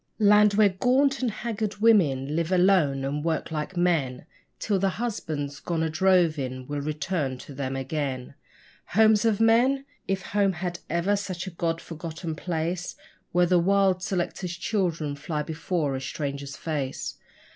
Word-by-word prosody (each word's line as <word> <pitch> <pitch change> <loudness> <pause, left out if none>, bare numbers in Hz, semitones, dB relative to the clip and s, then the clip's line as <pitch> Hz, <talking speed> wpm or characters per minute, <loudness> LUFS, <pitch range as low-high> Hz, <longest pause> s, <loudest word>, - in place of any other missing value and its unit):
Land 210 -1 +5
where 210 -1 +6
gaunt 260 +8 +2
and 250 - +1
haggard 215 -1 -3
women 155 -11 +3
live 165 +1 -1
alone 180 -8 +3
and 145 +2 -2
work 160 -1 -1
like 160 +4 -4
men, 150 -8 +1 0.3
Till 200 -3 0
their 195 +1 +2
husbands, 155 -10 -4
gone 165 -2 -2
a 160 - -1
droving, 155 -7 +2
will 145 +1 -3
return 150 -2 -2
to 140 - -11
them 135 -1 -3
again: 135 -2 -3 0.6
Homes 220 0 +5
of 220 -3 +2
men! 245 +5 +4 0.2
if 195 0 -1
home 200 -2 +1
had 175 0 -4
ever 170 +5 +1
such 190 -3 -4
a 190 - -6
God 165 -1 -1
forgotten 165 0 -6
place, 170 +2 -3 0.4
Where 175 0 +4
the 180 0 +4
wild 190 0 +3
selector's 180 -1 -3
children 170 -8 -1
fly 150 +1 -3
before 160 -2 -2
a 130 - -4
stranger's 140 +1 -4
face. 145 -5 -3
170 Hz, 155 wpm, -26 LUFS, 150-195 Hz, 0.6 s, where